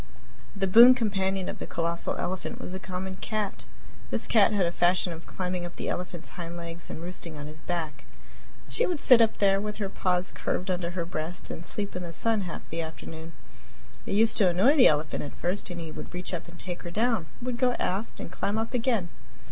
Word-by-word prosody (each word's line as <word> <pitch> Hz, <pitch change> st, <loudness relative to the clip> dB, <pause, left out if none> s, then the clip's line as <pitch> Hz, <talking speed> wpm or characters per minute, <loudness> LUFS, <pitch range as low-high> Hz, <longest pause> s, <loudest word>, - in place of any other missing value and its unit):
The 195 Hz, -1 st, 0 dB
boon 235 Hz, +7 st, +9 dB
companion 195 Hz, -5 st, 0 dB
of -, -, -5 dB
the -, -, -5 dB
colossal 170 Hz, 0 st, 0 dB
elephant 185 Hz, 0 st, -3 dB
was 180 Hz, -, -6 dB
a 190 Hz, -, -4 dB
common 190 Hz, 0 st, -5 dB
cat! 215 Hz, -2 st, -3 dB, 0.4 s
This -, -, 0 dB
cat 220 Hz, -3 st, +5 dB
had 200 Hz, -3 st, +2 dB
a 170 Hz, -, 0 dB
fashion 175 Hz, 0 st, +2 dB
of 165 Hz, 0 st, -11 dB
climbing 180 Hz, -1 st, -3 dB
up 175 Hz, 0 st, -7 dB
the -, -, -3 dB
elephant's 175 Hz, -1 st, -4 dB
hind 170 Hz, -1 st, -6 dB
legs 170 Hz, 0 st, -7 dB
and 160 Hz, -, -6 dB
roosting 175 Hz, -3 st, -6 dB
on 145 Hz, -, -6 dB
his 155 Hz, +1 st, -10 dB
back. 160 Hz, -5 st, -3 dB, 0.6 s
She 480 Hz, -, +2 dB
would 355 Hz, -, 0 dB
sit 250 Hz, -4 st, +7 dB
up 225 Hz, -1 st, +3 dB
there, 195 Hz, -1 st, +4 dB
with 210 Hz, 0 st, -3 dB
her 200 Hz, -3 st, -3 dB
paws 180 Hz, -1 st, 0 dB
curved 185 Hz, +1 st, -2 dB
under 175 Hz, -1 st, -1 dB
her 170 Hz, -, 0 dB
breast, 165 Hz, 0 st, -4 dB
and 165 Hz, -, -6 dB
sleep 200 Hz, +3 st, -3 dB
in 180 Hz, -, -3 dB
the 170 Hz, -2 st, -6 dB
sun 225 Hz, +4 st, +1 dB
half -, -, -7 dB
the 165 Hz, +1 st, -2 dB
afternoon. 160 Hz, +1 st, -8 dB, 0.7 s
It -, -, 0 dB
used 225 Hz, +2 st, +4 dB
to 195 Hz, -4 st, +6 dB
annoy 195 Hz, -, +5 dB
the 260 Hz, -4 st, +8 dB
elephant 150 Hz, 0 st, +1 dB
at 145 Hz, -, -7 dB
first, 185 Hz, +4 st, -2 dB
and 175 Hz, -1 st, -5 dB
he 165 Hz, -1 st, -6 dB
would 165 Hz, -, -8 dB
reach 180 Hz, +1 st, -5 dB
up 175 Hz, -, -4 dB
and 170 Hz, 0 st, -12 dB
take 180 Hz, -1 st, -5 dB
her 175 Hz, -, -6 dB
down, 220 Hz, -2 st, +1 dB
but -, -, -10 dB
she -, -, -4 dB
would 250 Hz, -1 st, -2 dB
go 250 Hz, -1 st, +3 dB
aft 200 Hz, 0 st, -2 dB
and -, -, -6 dB
climb 205 Hz, +2 st, -1 dB
up 225 Hz, +2 st, -2 dB
again. 230 Hz, -7 st, +1 dB
180 Hz, 230 wpm, -28 LUFS, 170-210 Hz, 0.7 s, boon